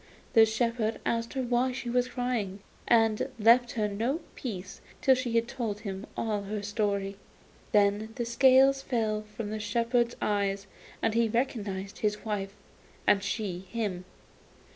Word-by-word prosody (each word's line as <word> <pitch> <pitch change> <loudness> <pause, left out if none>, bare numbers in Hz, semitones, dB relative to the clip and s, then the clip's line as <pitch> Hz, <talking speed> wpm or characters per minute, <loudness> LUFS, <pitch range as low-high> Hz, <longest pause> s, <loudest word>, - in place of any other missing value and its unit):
The 225 -1 +7
shepherd 225 0 0
asked 230 0 -1
her 265 - 0
why 245 +1 +1
she 255 -1 -5
was 245 +1 +1
crying, 245 -6 -2 0.3
and 225 +2 +3
left 235 +3 +5
her 215 -2 0
no 230 +10 -1
peace 200 -7 -6 0.2
till 265 - +5
she 245 -3 +1
told 225 -3 -4
him 195 -1 -5
all 215 -2 -1
her 205 +1 -4
story. 200 -2 -1 0.5
Then 205 +1 +3
the 240 - -2
scales 265 +3 +5
fell 220 -5 -1
from 210 0 -7
the 215 - -3
shepherd's 235 +3 +1
eyes, 200 -1 0 0.4
and 220 - +2
he 230 0 +2
recognised 205 -5 -2
his 210 0 -1
wife, 200 -2 -3 0.5
and 200 - +4
she 200 -3 -2
him. 190 -2 -4
220 Hz, 145 wpm, -29 LUFS, 205-240 Hz, 0.5 s, The